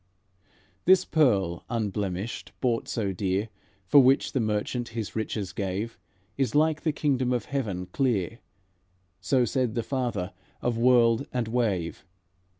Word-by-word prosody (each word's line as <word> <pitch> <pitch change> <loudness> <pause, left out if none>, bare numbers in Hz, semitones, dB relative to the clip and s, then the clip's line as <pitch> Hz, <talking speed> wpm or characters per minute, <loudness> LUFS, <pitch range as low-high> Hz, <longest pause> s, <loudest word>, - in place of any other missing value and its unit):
"'This 185 0 +6
pearl 100 - +2
unblemished, 105 -2 -3
bought 120 -3 0
so 100 -4 -1
dear, 95 +3 -1 0.4
For 145 - +6
which 135 +1 +3
the 135 - 0
merchant 110 +2 -1
his 110 -3 -4
riches 110 -3 -3
gave, 100 +2 -3 0.4
Is 135 -2 0
like 155 +1 +3
the 160 - +1
kingdom 135 -4 0
of 120 -4 0
heaven 105 -10 -3
clear;' 115 -2 -1 0.8
So 130 -3 +2
said 125 -1 -1
the 115 - 0
Father 120 -8 -2 0.3
of 120 -1 -1
world 120 +1 +4
and 125 -3 -1
wave. 105 -8 -1
115 Hz, 135 wpm, -27 LUFS, 100-130 Hz, 0.8 s, This